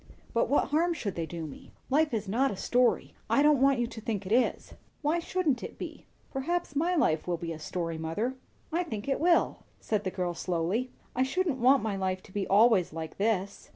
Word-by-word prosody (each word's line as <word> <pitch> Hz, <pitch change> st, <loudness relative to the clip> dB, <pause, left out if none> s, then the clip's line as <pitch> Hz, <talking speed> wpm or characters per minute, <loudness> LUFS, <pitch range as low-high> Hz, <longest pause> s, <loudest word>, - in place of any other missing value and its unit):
"But 230 Hz, -, +2 dB
what 285 Hz, -, +2 dB
harm 335 Hz, +3 st, +2 dB
should 205 Hz, -, -3 dB
they 165 Hz, -1 st, -3 dB
do 165 Hz, 0 st, -5 dB
me?" 145 Hz, -, -11 dB, 0.2 s
"Life 305 Hz, +2 st, +3 dB
is 215 Hz, -3 st, -2 dB
not 250 Hz, +8 st, +2 dB
a 205 Hz, -, -4 dB
story. 245 Hz, +4 st, +2 dB, 0.2 s
I 280 Hz, -, +4 dB
don't 295 Hz, -3 st, +5 dB
want 275 Hz, -1 st, +5 dB
you 240 Hz, -, +1 dB
to 230 Hz, -1 st, -8 dB
think 210 Hz, -3 st, -3 dB
it 185 Hz, -, -6 dB
is." 245 Hz, +3 st, +1 dB, 0.3 s
"Why 310 Hz, +4 st, +2 dB
shouldn't 330 Hz, -7 st, 0 dB
it -, -, -7 dB
be? -, -, -8 dB, 0.2 s
Perhaps 315 Hz, +3 st, -2 dB
my 340 Hz, +5 st, +2 dB
life 160 Hz, -, +2 dB
will 175 Hz, -1 st, 0 dB
be 165 Hz, 0 st, -5 dB
a 155 Hz, -, -8 dB
story, 165 Hz, 0 st, -3 dB
mother. 185 Hz, +11 st, -2 dB, 0.4 s
I 335 Hz, +3 st, +1 dB
think 220 Hz, -11 st, -5 dB
it 270 Hz, -, 0 dB
will," 340 Hz, +1 st, +3 dB, 0.2 s
said 210 Hz, -2 st, -1 dB
the 190 Hz, -, -1 dB
girl 180 Hz, -1 st, -2 dB
slowly. 180 Hz, +9 st, -1 dB, 0.3 s
"I 255 Hz, -, +1 dB
shouldn't 285 Hz, +1 st, 0 dB
want 255 Hz, 0 st, +5 dB
my 215 Hz, -3 st, -1 dB
life 185 Hz, -1 st, -2 dB
to 205 Hz, -, -16 dB
be 195 Hz, -1 st, -2 dB
always 210 Hz, -2 st, +5 dB
like 160 Hz, -1 st, -6 dB
this." 200 Hz, -2 st, -1 dB
230 Hz, 220 wpm, -29 LUFS, 185-280 Hz, 0.4 s, don't